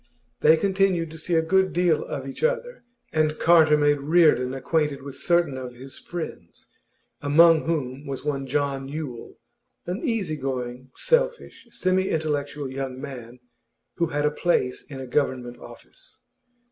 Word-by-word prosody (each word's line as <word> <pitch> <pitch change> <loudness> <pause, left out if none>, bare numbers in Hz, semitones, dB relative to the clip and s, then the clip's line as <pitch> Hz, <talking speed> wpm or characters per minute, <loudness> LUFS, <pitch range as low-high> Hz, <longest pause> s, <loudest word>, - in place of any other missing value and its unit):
They 160 +1 +6
continued 190 -3 +1
to 160 - -9
see 170 +2 -1
a 160 - +3
good 190 +3 +2
deal 175 -3 +2
of 135 -1 -5
each 135 - -7
other, - - -1 0.3
and 155 -1 +1
Carter 160 -2 +5
made 145 -1 +3
Reardon 150 -5 +4
acquainted 140 +1 -1
with 140 -1 -7
certain 170 -6 +2
of 125 -1 -8
his 130 +2 -10
friends, 160 - -8 0.5
among 160 +3 +5
whom 140 -3 -3
was 135 0 -5
one 140 -2 -2
John 140 -1 -1
Yule, 140 -5 -7 0.5
an 180 +5 -4
easy 220 - -1
going, 130 -1 -4
selfish, 485 - 0
semi 185 -3 0
intellectual 150 -2 -2
young 130 -1 -5
man 125 -3 -9 0.6
who 170 - +1
had 145 -1 -1
a 150 - +2
place 150 -6 0
in 135 - -7
a 130 - -6
Government 125 -2 -1
office. - - -13
150 Hz, 150 wpm, -25 LUFS, 135-170 Hz, 0.6 s, They